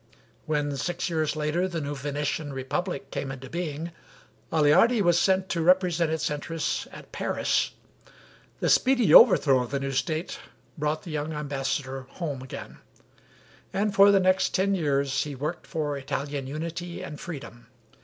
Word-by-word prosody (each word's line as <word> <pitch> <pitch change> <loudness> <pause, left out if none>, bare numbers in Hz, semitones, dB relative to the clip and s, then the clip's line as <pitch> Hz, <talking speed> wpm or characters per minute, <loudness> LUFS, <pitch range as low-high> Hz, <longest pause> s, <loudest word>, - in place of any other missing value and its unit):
When 145 -2 -1
six 175 +4 -2
years 155 -2 0
later 155 +4 0
the 170 -3 -3
new 145 -1 -3
Venetian 145 +1 -3
republic 135 +2 -3
came 135 - -3
into 135 -1 -9
being, 170 -1 -4 0.6
Aleardi 165 +10 +4
was 175 -3 +4
sent 190 0 +2
to 170 - -1
represent 175 -1 +3
its 160 -1 -1
interests 155 +2 -2
at - - -12
Paris. - - 0 0.9
The - - +2
speedy 255 -3 +4
overthrow 145 - +7
of 125 - -4
the 140 - -1
new 135 0 -3
State 155 +5 -2 0.4
brought 150 +1 -2
the 175 - -8
young 155 +1 -3
ambassador 135 -2 -3
home 145 -7 -5
again, 130 - -9 0.9
and 200 +2 0
for 200 +1 +7
the 200 -1 +5
next 185 0 +2
ten 200 +1 +2
years 140 -5 +1
he 145 -2 -6
worked 150 +6 -4
for 150 -4 -2
Italian 140 0 -4
unity 170 +5 -5
and 150 -5 -7
freedom. 135 -8 -8
155 Hz, 155 wpm, -26 LUFS, 140-175 Hz, 0.9 s, overthrow